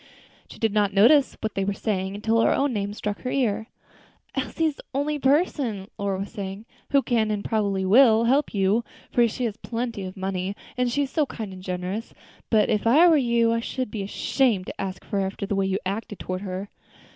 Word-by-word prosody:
She - - -11
did 220 -2 0
not 205 -2 +1
notice 260 +8 +5
what 220 - -2
they 195 - -1
were 200 +1 0
saying, 195 -2 -2
until 225 +2 +1
her - - +4
own 275 -2 +1
name 205 -2 -2
struck 210 0 -4
her 255 - -3
ear. 225 -5 0 0.7
"Elsie 325 - -1
is 305 -3 0
the - - -12
only 295 +2 0
person," 265 - +1
Lora 200 -1 -1
was 200 - -6
saying, 200 0 -6 0.2
"who 275 -1 +3
can, 225 -4 +1
and 210 -1 -2
probably 200 -4 0
will, 225 +2 +6
help 270 +5 +2
you; 200 +3 +2 0.3
for 240 -1 +4
she 245 +3 -3
has 220 -2 -3
plenty 230 0 -4
of 185 +1 -8
money, 190 0 -2 0.2
and 250 -1 0
she 285 +4 +1
is 270 - -5
so 305 -3 +1
kind 215 -6 -6
and 185 - -10
generous; 185 +4 -4 0.3
but, 215 -2 +4
if 215 0 0
I 305 +9 +7
were 330 - +6
you, 235 -4 +3
I 230 - +1
should 250 0 -4
be 210 - -4
ashamed 205 0 +1
to - - -6
ask 190 -1 -5
her, 200 - -2
after 195 +1 -3
the 205 - -2
way 195 0 +1
you 190 0 0
acted 205 +1 -4
toward 185 0 -4
her." 195 0 -5
215 Hz, 215 wpm, -25 LUFS, 195-245 Hz, 0.7 s, I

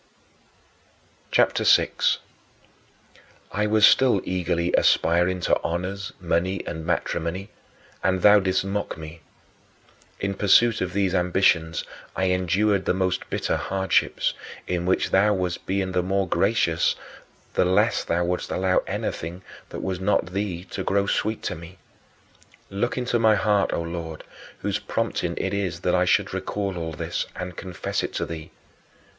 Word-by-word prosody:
CHAPTER - - +2
VI - - +5 1.6
9. 105 - 0
I - - +2
was 105 0 +5
still 125 -6 +5
eagerly 90 -1 -1
aspiring 90 +2 +3
to - - +1
honors, 90 +3 -3
money, 90 +2 -1
and 80 -1 -5
matrimony; 85 +3 -2 0.5
and 95 -1 +1
thou 105 0 +8
didst 95 0 0
mock 100 -2 -3
me. 80 +1 -9 1.0
In 100 0 -1
pursuit 105 +4 +4
of 90 -1 -2
these 95 -2 +1
ambitions 90 -3 +2 0.3
I 95 -1 +1
endured 95 +2 +1
the - - +1
most 95 -1 -1
bitter - - -1
hardships, 95 0 0 0.3
in 90 -1 -2
which 95 - +1
thou 105 +2 +4
wast 90 -2 -3
being 95 0 -1
the 90 -1 +1
more 95 +1 0
gracious 95 -4 +2 0.6
the - - +3
less 95 +5 +2
thou 85 +1 0
wouldst 90 +1 -2
allow 95 0 +2
anything 85 +3 -4 0.3
that - - -6
was 95 -2 -2
not 95 -2 0
thee 95 -3 -2
to - - -3
grow 100 0 +1
sweet 110 +2 -1
to - - -2
me. 85 +3 -11 0.9
Look 105 +7 -1
into 125 -1 0
my 110 -1 +5
heart, 105 0 +2
O 85 - -1
Lord, 85 -1 -6 0.4
whose - - -1
prompting - - -2
it - - -2
is 90 -4 -2
that 90 - +1
I 90 0 +3
should - - +2
recall 100 -2 -3
all 80 -2 -4
this, - - -3
and 90 -1 -6
confess 90 0 -3
it - - -4
to - - -1
thee. 80 -2 -7
95 Hz, 150 wpm, -24 LUFS, 85-100 Hz, 1.6 s, thou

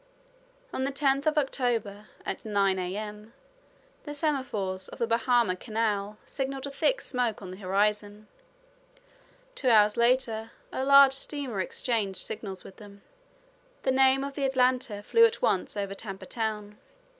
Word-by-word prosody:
On 260 - -2
the 275 - -1
10th 275 +1 +1
of 310 0 +2
October, 230 -7 -1 0.2
at - - -4
nine 200 -3 +1
A.M., 210 +4 -5 0.7
the 295 -1 -6
semaphores 235 - -2
of - - -11
the 235 - 0
Bahama 230 -3 +2
Canal 210 -1 -2
signaled 270 0 -4
a 280 - -6
thick 320 - +1
smoke 245 -4 -1
on 185 -3 -8
the 185 - -9
horizon. 205 +2 -1 1.3
Two 265 - 0
hours 210 -1 +5
later 235 -2 +1 0.2
a 260 - -2
large 275 0 +7
steamer 270 -5 -4
exchanged 200 -1 -2
signals 195 -3 -6
with 190 - -13
them. 200 -1 -14 0.8
the 260 - +2
name 265 +1 +4
of 280 0 -5
the 280 - -3
Atlanta 250 -5 +1
flew 460 - +4
at 460 0 +4
once 210 -3 +1
over 200 -1 -2
Tampa 195 -1 -8
Town. 210 -2 -4
225 Hz, 145 wpm, -28 LUFS, 205-265 Hz, 1.3 s, large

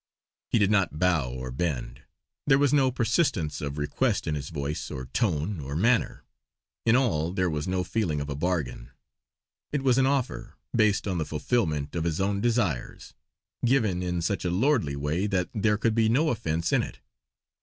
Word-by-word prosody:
He - - +2
did 100 -2 +3
not 95 -7 +2
bow 80 -7 +2
or 65 0 -6
bend; 65 -4 -3 0.5
there 135 -2 +6
was 145 0 +3
no 135 -3 +4
persistence 120 - 0
of 70 0 -4
request 100 - 0
in 80 - -1
his 70 -1 -4
voice, 75 -1 -4
or 65 - -5
tone, 85 - -1
or 70 0 -5
manner. 115 +8 +1 0.6
In 115 - +6
all 85 - +1
there 95 -2 +1
was 75 +1 -3
no 90 0 0
feeling 90 -4 -1
of 70 - -4
a 70 - -3
bargain. 75 -7 -2 0.8
It 145 -2 -1
was 130 -1 +4
an 130 - +4
offer, 135 -2 -2 0.2
based 105 -2 +2
on 90 -3 -1
the - - +1
fulfillment 75 - -1
of 85 -1 -1
his 80 -2 -1
own 100 +1 0
desires; 110 - -1 0.5
given 115 -8 +2
in 90 -2 -2
such 90 +1 -1
a 90 - 0
lordly 95 - +1
way 75 +8 -1
that 90 -3 0
there 105 0 +2
could 115 +1 +1
be 110 -1 +3
no 150 +7 +3
offence 85 -6 -1
in - - +4
it. - - -7
90 Hz, 185 wpm, -27 LUFS, 75-115 Hz, 0.8 s, there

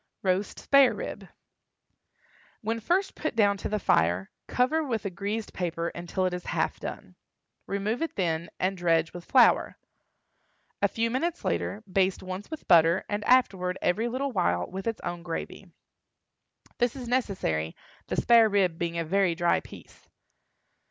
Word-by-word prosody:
ROAST 190 +1 0
SPARE 275 -2 +5
RIB. - - -6 1.3
When 225 +1 -2
first 370 - 0
put 310 -5 -4
down 205 -3 +4
to - - -4
the 215 - 0
fire, 90 - +1 0.2
cover 300 +6 +1
with 230 -8 -3
a 200 - -2
greased 205 +4 -4
paper 170 -2 -2
until 175 +2 -3
it 180 - 0
is 180 0 -5
half - - -1
done. - - -7 0.5
Remove 200 +5 -2
it 330 - -2
then, 170 -3 -1
and 190 +1 0
dredge 165 -2 +1
with 175 -1 -9
flour. 250 -3 +4 1.0
A - - +5
few 230 0 -1
minutes 330 +7 -2
later, 210 +2 -2
baste 190 0 0
once 185 +2 -6
with 315 -1 -8
butter, 170 +1 +5
and 205 0 -2
afterward, 190 -8 +3
every 215 +7 +1
little 265 +3 -2
while, 90 - +1
with 190 +3 -6
its 225 - -2
own 175 0 -4
gravy. 170 -1 -6 1.1
This 245 0 +1
is 255 -3 -7
necessary, 190 - -1 0.3
the - - -2
spare 230 -2 +5
rib 185 -5 +1
being 170 -1 -2
a 165 - -1
very 190 0 +2
dry 170 0 +2
piece. - - -15
195 Hz, 160 wpm, -27 LUFS, 175-230 Hz, 1.3 s, SPARE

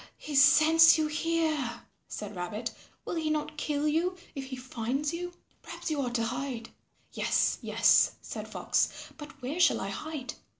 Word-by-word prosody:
"He 300 - -8
scents 315 +4 +7
you 315 - +1
here," 310 -5 -1 0.2
said 210 -1 -7
Rabbit, 205 +6 -4 0.3
"will - - -4
he 320 -2 -1
not 305 0 -2
kill 295 0 -1
you 345 +4 0 0.2
if 275 -1 -5
he 265 0 -6
finds 255 +4 -3
you? 355 +1 -4 0.3
Perhaps - - -6
you 295 -2 0
ought 245 -2 -3
to 230 - +1
hide." 245 0 -4 0.4
"Yes, - - +1
yes," - - +4
said - - -7
Fox, - - +1 0.3
"but 295 -1 -10
where 285 +8 -3
shall 340 - +4
I 195 - -4
hide?" 280 +6 -5
295 Hz, 165 wpm, -29 LUFS, 250-315 Hz, 0.4 s, scents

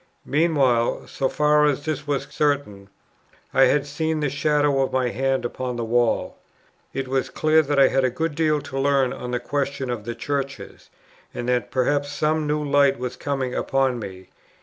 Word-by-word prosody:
Meanwhile, 140 -6 +2
so 135 - -1
far 150 0 +3
as 145 -1 0
this 150 -2 -3
was 145 -2 0
certain, 135 -10 -1 0.6
I 135 - +6
had 145 -1 +2
seen 160 +2 -2
the 145 -3 -1
shadow 145 -1 +2
of 130 - -1
a 125 -2 +1
hand 135 0 0
upon 125 0 -4
the 120 -1 -3
wall. 120 +1 0 0.5
It 135 -1 -4
was 130 0 -1
clear 155 +1 +3
that 145 -1 -2
I 135 -1 +6
had 135 0 +1
a 130 - +3
good 160 +6 -2
deal 155 -1 +1
to 135 -1 -5
learn 135 -2 +2
on 125 - -6
the 125 0 -1
question 140 -2 -2
of 115 -4 -5
the 120 0 -4
Churches, 140 +2 -5 0.5
and 120 - -4
that 125 -4 0
perhaps 145 +2 0
some 155 +1 0
new 150 0 -1
light 140 -1 +4
was 125 0 -4
coming 135 -3 -3
upon 135 -2 0
me. 95 -3 -9
135 Hz, 185 wpm, -23 LUFS, 125-145 Hz, 0.6 s, I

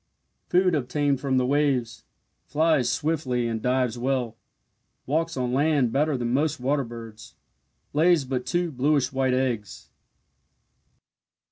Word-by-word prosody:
Food 180 0 +3
obtained 140 0 0
from 135 -2 0
the 125 - +2
waves 135 -4 0 0.4
flies 155 -2 +2
swiftly 140 -6 -1
and 115 -1 -3
dives 125 -1 0
well 125 -3 -1 0.7
walks 165 +2 -1
on 125 -1 -1
land 140 -3 +2
better 145 +1 +1
than 120 -1 -2
most 150 +2 0
water 140 +3 0
birds. 115 -2 -10 0.6
Lays 160 -1 +3
but 130 -1 -3
two 175 -2 0
bluish 140 +1 +1
white 130 -1 +1
eggs. 120 -6 -3
135 Hz, 125 wpm, -25 LUFS, 125-150 Hz, 0.7 s, Food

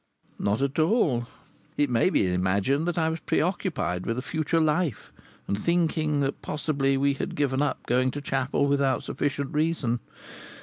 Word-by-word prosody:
Not 105 +6 0
at 140 +3 -1
all! 155 - +2 0.5
It 145 - +3
may 120 +6 +2
be 90 - +2
imagined 100 - +1
that 175 - -1
I 160 -1 +2
was 160 +1 -2
preoccupied 165 - -1
with 115 - -1
a 130 - -3
future 160 +2 0
life, 155 -1 0 0.3
and 100 - -1
thinking 160 -3 +1
that 140 0 -2
possibly 140 -3 0
we 140 +1 +2
had 135 - -4
given 140 -2 +1
up 145 - -1
going 130 +2 +2
to 145 - -4
chapel 135 0 0
without 140 -2 +1
sufficient 140 -1 -2
reason. 150 -6 0
140 Hz, 165 wpm, -26 LUFS, 130-155 Hz, 0.5 s, It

